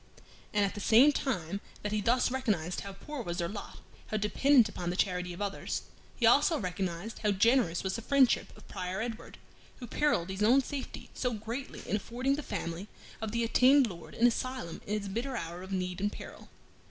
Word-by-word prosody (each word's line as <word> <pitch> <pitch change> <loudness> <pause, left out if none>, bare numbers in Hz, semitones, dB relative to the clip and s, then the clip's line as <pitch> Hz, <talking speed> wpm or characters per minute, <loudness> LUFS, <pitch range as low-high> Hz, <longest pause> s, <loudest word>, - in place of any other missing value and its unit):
And 205 -1 +3
at 195 - -2
the - - -6
same 245 +9 +7
time 200 - -2 0.2
that 210 - -2
he 210 0 0
thus 245 +4 +2
recognized 205 -10 -1
how 200 -1 -7
poor 280 +8 -7
was 175 -6 -4
their 170 -2 0
lot, 205 +3 -7 0.3
how 215 - -1
dependent 235 +4 +4
upon 175 -4 -4
the 175 - -2
charity 180 -1 0
of 175 +4 -4
others, 200 -1 -3 0.3
he 240 - +1
also 290 +7 +5
recognized 185 0 -3
how 210 - +1
generous 205 -3 +3
was 190 +2 -1
the - - -5
friendship 265 +1 +3
of - - -16
Prior 185 +1 -4
Edward, 230 0 -5 0.4
who 250 - -7
perilled 235 - +1
his 190 +1 -5
own 245 +6 +6
safety 275 0 -6
so 250 -2 -1
greatly 230 +5 -6
in 210 - 0
affording 255 +6 -1
the 295 - -4
family 170 - -4 0.3
of 220 -1 -3
the 235 +1 0
attainted 255 +1 +5
Lord 170 -2 -11
an 235 - +3
asylum 245 -6 -1
in 210 - 0
its 205 -1 -3
bitter 240 +7 -3
hour 170 -1 -5
of 190 +1 -9
need 185 -1 -2
and 205 +1 +1
peril. - - -10
210 Hz, 200 wpm, -31 LUFS, 185-250 Hz, 0.4 s, same